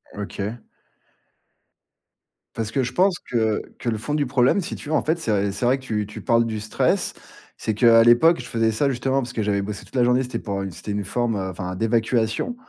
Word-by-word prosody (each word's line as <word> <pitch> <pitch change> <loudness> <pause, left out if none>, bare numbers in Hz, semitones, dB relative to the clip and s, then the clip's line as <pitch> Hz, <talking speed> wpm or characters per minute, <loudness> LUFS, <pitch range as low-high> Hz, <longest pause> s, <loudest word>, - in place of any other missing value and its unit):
OK. 105 +2 -5 2.0
Parce 110 -1 -3
que 135 0 +1
je 125 - -3
pense 185 +2 +3
que 110 -3 0 0.2
que 120 - -2
le 110 - -1
fond 125 +7 -4
du 150 -1 +1
problème, 125 +7 +3
si - - -5
tu 150 - -9
veux 155 - +1
en - - +2
fait, 160 +2 +1
c'est 115 -9 -2
v 100 - -1
c'est 100 +5 -3
vrai 130 +3 +3
que 130 - -15
tu 105 -4 -2
tu 105 - -9
parles 115 -1 +3
du 110 -2 -3
stress, 110 - 0 0.4
c'est 110 - -2
qu'à 115 +1 +6
l'époque, 125 +8 +5
je 125 - -10
faisais 115 -2 +1
ça 140 +6 +1
justement 135 +2 0
parce 120 0 -6
que 110 - -2
j'avais 100 -1 0
bossé 100 0 -6
toute - - -17
la 125 - +3
journée, 125 +2 +3
c'était 125 - -4
pour 100 -2 -3
u 95 - -5
c'était 105 - -7
une 100 -1 -2
forme, 120 0 -1
heu, 95 -1 -3
enfin 90 0 -5
d'évacuation 115 - 0
115 Hz, 230 wpm, -23 LUFS, 105-130 Hz, 2.0 s, qu'à